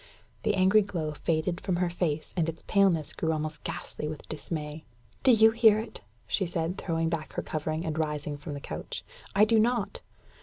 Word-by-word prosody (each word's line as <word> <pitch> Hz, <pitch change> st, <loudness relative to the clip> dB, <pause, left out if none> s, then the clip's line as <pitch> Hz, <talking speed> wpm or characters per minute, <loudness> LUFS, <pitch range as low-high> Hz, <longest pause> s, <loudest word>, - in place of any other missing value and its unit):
The 215 Hz, -2 st, +1 dB
angry 190 Hz, +3 st, +5 dB
glow 170 Hz, -6 st, -3 dB
faded 165 Hz, +3 st, -1 dB
from 185 Hz, -, 0 dB
her 175 Hz, 0 st, 0 dB
face, 160 Hz, -3 st, -2 dB
and 165 Hz, -3 st, +1 dB
its 165 Hz, -, -7 dB
paleness 190 Hz, -7 st, +3 dB
grew 160 Hz, -, 0 dB
almost 155 Hz, -1 st, -3 dB
ghastly 150 Hz, -, -5 dB
with 155 Hz, 0 st, -7 dB
dismay. 155 Hz, 0 st, -5 dB, 0.4 s
"Do 265 Hz, -, +6 dB
you 220 Hz, -1 st, +7 dB
hear 225 Hz, -2 st, +6 dB
it?" 220 Hz, +2 st, -5 dB, 0.2 s
she 190 Hz, -, 0 dB
said, 170 Hz, +2 st, -2 dB
throwing 165 Hz, -2 st, 0 dB
back 160 Hz, -1 st, -3 dB
her -, -, -2 dB
covering, 155 Hz, +1 st, -2 dB
and 160 Hz, 0 st, -2 dB
rising 150 Hz, -1 st, -2 dB
from 145 Hz, +1 st, -6 dB
the -, -, -5 dB
couch. -, -, -5 dB, 0.3 s
"I 205 Hz, +2 st, +7 dB
do 220 Hz, 0 st, +4 dB
not." 235 Hz, -1 st, +1 dB
165 Hz, 190 wpm, -29 LUFS, 155-195 Hz, 0.4 s, you